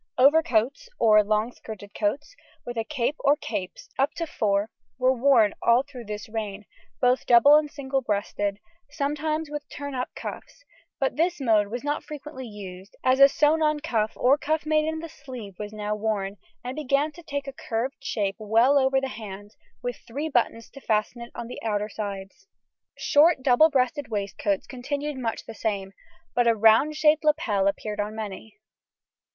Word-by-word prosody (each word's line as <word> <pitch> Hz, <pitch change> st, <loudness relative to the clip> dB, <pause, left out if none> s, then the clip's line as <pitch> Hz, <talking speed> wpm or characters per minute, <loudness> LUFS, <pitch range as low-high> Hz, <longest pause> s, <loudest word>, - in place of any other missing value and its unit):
Overcoats 280 Hz, -, +3 dB
(or 215 Hz, -2 st, +5 dB
long 215 Hz, +3 st, 0 dB
skirted 205 Hz, -4 st, -10 dB
coats) 280 Hz, -, -2 dB, 0.3 s
with 240 Hz, -, -5 dB
a 225 Hz, -, -1 dB
cape 285 Hz, +2 st, -2 dB
or 285 Hz, +1 st, +4 dB
capes, 185 Hz, -, -5 dB
up 280 Hz, +4 st, +1 dB
to 335 Hz, -, -2 dB
four, 205 Hz, -6 st, 0 dB, 0.3 s
were 255 Hz, 0 st, +3 dB
worn 245 Hz, -5 st, +4 dB
all 235 Hz, +2 st, +4 dB
through 265 Hz, -4 st, -10 dB
this 210 Hz, 0 st, -6 dB
reign, 210 Hz, -2 st, -5 dB, 0.3 s
both 250 Hz, 0 st, +2 dB
double 245 Hz, +5 st, +8 dB
and 300 Hz, -1 st, +3 dB
single 270 Hz, -2 st, -2 dB
breasted, 205 Hz, -2 st, -1 dB, 0.3 s
sometimes 300 Hz, +1 st, -2 dB
with 295 Hz, 0 st, -6 dB
turn 285 Hz, -1 st, -6 dB
up 250 Hz, -1 st, -2 dB
cuffs; -, -, -8 dB, 0.3 s
but 270 Hz, +1 st, 0 dB
this 345 Hz, +2 st, +1 dB
mode 220 Hz, -6 st, +3 dB
was 240 Hz, +5 st, -5 dB
not 290 Hz, +1 st, -1 dB
frequently 295 Hz, -3 st, -8 dB
used, 195 Hz, -2 st, -10 dB
as 260 Hz, +1 st, +3 dB
a 275 Hz, 0 st, +9 dB
sewn 300 Hz, +3 st, +3 dB
on 305 Hz, -1 st, +2 dB
cuff 225 Hz, -8 st, -1 dB
or 270 Hz, +4 st, +3 dB
cuff 310 Hz, +1 st, -1 dB
made 310 Hz, 0 st, +2 dB
in 320 Hz, 0 st, -2 dB
the 330 Hz, -, -6 dB
sleeve 255 Hz, -9 st, -9 dB
was 210 Hz, 0 st, -5 dB
now 210 Hz, 0 st, -3 dB
worn, 210 Hz, -2 st, -2 dB, 0.3 s
and 250 Hz, +1 st, -5 dB
began 290 Hz, +1 st, +1 dB
to 345 Hz, -, -13 dB
take 285 Hz, -4 st, -4 dB
a 275 Hz, -, -6 dB
curved 255 Hz, +2 st, -4 dB
shape 200 Hz, -7 st, -1 dB
well 230 Hz, +6 st, +4 dB
over 265 Hz, 0 st, +3 dB
the 270 Hz, -, -3 dB
hand, 205 Hz, -3 st, -9 dB, 0.3 s
with 245 Hz, -1 st, -3 dB
three 280 Hz, +7 st, -3 dB
buttons 235 Hz, -5 st, 0 dB
to 275 Hz, -, -12 dB
fasten 220 Hz, +1 st, 0 dB
it 235 Hz, -, -9 dB
on 235 Hz, -, -5 dB
the 245 Hz, -, -8 dB
outer 210 Hz, -1 st, -1 dB
sides. 195 Hz, -2 st, -7 dB, 0.5 s
Short 295 Hz, -1 st, +4 dB
double 270 Hz, +5 st, +6 dB
breasted 260 Hz, -1 st, 0 dB
waistcoats 200 Hz, -2 st, -2 dB
continued 285 Hz, +3 st, -4 dB
much 230 Hz, -3 st, -3 dB
the 225 Hz, -, -8 dB
same, 200 Hz, -3 st, -3 dB, 0.4 s
but 245 Hz, -1 st, +2 dB
a 230 Hz, -, +5 dB
round 225 Hz, +8 st, +5 dB
shaped 305 Hz, +1 st, +4 dB
lapel 230 Hz, -11 st, +2 dB
appeared 210 Hz, +1 st, -2 dB
on 210 Hz, +1 st, -2 dB
many. 215 Hz, 0 st, -7 dB
245 Hz, 180 wpm, -26 LUFS, 215-290 Hz, 0.5 s, a